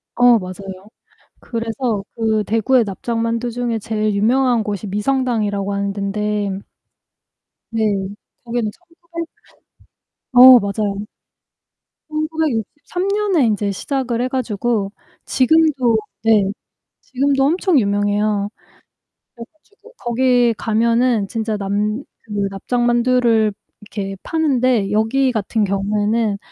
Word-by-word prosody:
어 245 -1 +6
맞아요. 190 +1 -8 0.5
그래서 230 -2 -3
그 220 -2 +1
대구의 225 +3 +2
납작만두 230 +3 -2
중에 235 -1 -2
제일 215 0 -1
유명한 240 +3 +2
곳이 210 -1 -4
미성당이라고 210 -2 -1
하는 200 0 -1
덴데 200 0 -2 1.1
네. 225 -1 0 0.6
거기는 235 -3 -2
1,800 340 +2 -9 1.1
어 255 0 +10
맞아요. 200 0 -3 1.0
1963 310 - -2
년에 395 -7 +2
인제 205 -2 0
시작을 245 +3 -2
해 250 - 0
가지고 235 -5 -1 0.3
지금도 265 -4 +3 0.3
네 220 -3 +4 0.6
지금도 270 +1 0
엄청 345 +2 +2
유명해요. 205 -1 +1 0.9
그래 230 -1 -8
가지고 410 +8 -22
거기 245 0 +2
가면은 230 0 +1
진짜 220 -1 -2
남 205 +4 -1 0.3
그 205 -1 -1
납작만두를 240 0 +2 0.3
이렇게 195 -2 -6
파는데 255 -10 +1
여기 235 +5 +2
같은 220 -1 -1
경우에는 205 +2 0
225 Hz, 225 characters per minute, -19 LUFS, 205-255 Hz, 1.1 s, 어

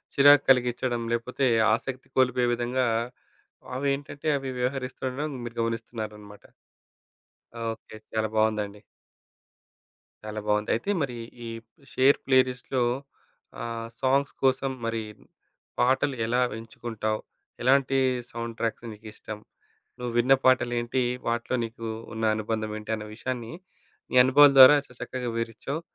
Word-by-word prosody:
చిరాకు 145 +1 +7
కలిగిచ్చడం, 125 -1 +2
లేపోతే 125 +3 -1 0.3
ఆసక్తి 130 +3 -4
కోల్పోయే 125 -1 +3
విధంగా, 120 +2 0 0.9
అవేంటంటే 140 +2 -2
అవి 135 -1 -5
వ్యవహరిస్తుండడం 130 +2 -3
మీరు 120 0 -8
గమనిస్తున్నారనమాట. 110 -2 -5 1.3
ఓకే. 110 -1 -14 0.2
చాలా 110 0 +1
బావుందండి. 105 -2 0 1.4
చాలా 110 0 -5
బావుంది. 105 0 +1
అయితే 120 - -2
మరి 125 -4 -2 0.3
ఈ - - -5 0.4
షేర్ 135 +2 +5
ప్లేరిస్ట్‌‌లో, 130 -1 +2 0.8
ఆహ్, 115 0 -4
సాంగ్స్ 140 +1 +2
కోసం 135 0 +2
మరి 115 -1 -2 0.8
పాటలు 130 +2 +2
ఎలా 120 +2 +1 0.2
ఎంచుకుంటావు, 110 -1 -4 0.4
ఎలాంటి 135 +1 +3 0.3
సౌండ్ 115 -1 -5
ట్రాక్స్ర్ 115 +1 -3
మీకిష్టం. 105 0 -9 0.6
నువ్విన్న 120 +2 +3
పాటలు 125 -2 +4
ఏంటి, 120 +2 -1 0.2
వాటిలో 120 +2 -1
నీకు 115 0 -7 0.3
ఉన్న 110 - -4
అనుబంధం 110 0 -3
ఏంటి, 105 +1 -7
అన్న 105 -1 -7
విషయాన్ని, 120 -1 -5 0.6
నీ - - -4
అనుభవాల 140 +2 +7
ద్వారా 130 +3 +11
చా - - -20
చక్కగా 125 0 -4
వివరించావు. 115 +7 -4
120 Hz, 110 wpm, -26 LUFS, 115-130 Hz, 1.4 s, ద్వారా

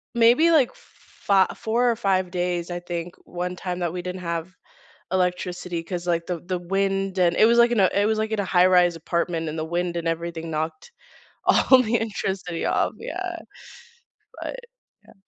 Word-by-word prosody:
Maybe 240 +9 +5
like 285 -7 +4
f - - -21
fi 195 -2 0
4 235 +2 +1
or 230 - +1
5 190 -4 0
days, 175 -1 -2
I 175 0 -3
think, 175 0 -5
one 180 +1 -4
time 180 -1 -4
that 175 -2 -1
we 180 - -4
didn't 180 0 -5
have 170 +1 -3 0.6
electricity 180 -1 -1
'cause, 175 0 -5
like, 170 -1 0
the 175 -1 -3
the 180 +2 -3
wind 195 +1 -1
and 175 -1 +3
it - - +6
was, 235 +1 +4
like, 235 - +6
in 235 - +2
a 190 -2 +5
it 200 +1 +2
was, 220 0 +1
like, 220 0 -1
in 220 - -1
a 200 - 0
high 180 -1 +4
rise 180 -2 +4
apartment, 165 0 -2
and 155 +1 -5
the 155 - -2
wind 175 +1 -2
and 170 -1 -3
everything 165 0 -3
knocked 160 - -4 0.5
all 260 -1 +5
the 235 0 0
electricity 190 -6 -3
off, - - +1
yeah. - - -5 1.0
But - - -5 0.5
yeah. - - -17
180 Hz, 195 wpm, -24 LUFS, 170-200 Hz, 1.0 s, it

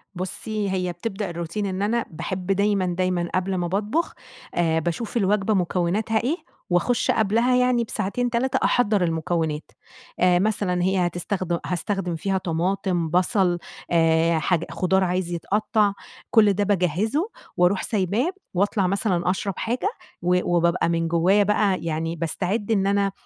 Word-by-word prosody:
بُصّي، 205 +3 -3
هي 180 -1 -1
بتبدأ 195 +2 -4
الروتين 170 +4 -4
إن 190 0 -3
أنا 230 +3 0
باحب 180 +3 -5
دايمًا، 200 -1 +2
دايمًا 180 -1 -1
قبل 185 +1 0
ما 175 -1 -1
باطبخ 210 - -1 0.4
آآ، 165 -2 +2
باشوف 175 +9 -3
الوجبة 210 0 +2
مكوناتها 190 +5 0
إيه، 300 +8 0 0.3
وأخشّ 180 +7 +2
قبلها 230 +4 +2
يعني 250 -1 +3
بساعتين 235 +3 -2
3 260 +3 0
أحضّر 210 -6 +2
المكونات. 160 -2 -1 0.5
آآ، 180 -1 +4
مثلًا 195 -3 0
هي 185 -1 +2
هتستخدم 175 0 -2
هاستخدم 180 0 -2
فيها 190 +4 -1
طماطم 175 0 -1
بصل 180 +1 +2 0.3
آآ، 165 0 +3
حاج 170 0 +1
خضار 190 +1 +1
عايز 180 -1 -1
يتقطّع، 210 +4 +1 0.4
كل 215 -4 +5
ده 205 +2 0
باجهّزُه 205 - 0 0.3
وأرُوح 180 +2 +3
سايباه، 215 - 0 0.2
وأطلع 195 0 +1
مثلًا 185 -3 0
أشرب 195 +1 -1
حاجة، 245 - -1 0.3
و 180 0 +1
وبابقى 170 0 +2
من 165 0 0
جوايا 180 +5 +3
بقى 200 -2 +1
يعني 165 0 -2
باستعِدّ 195 +7 -2
إن 195 -2 +2
أنا، 200 0 +2
190 Hz, 140 wpm, -24 LUFS, 175-210 Hz, 0.5 s, كل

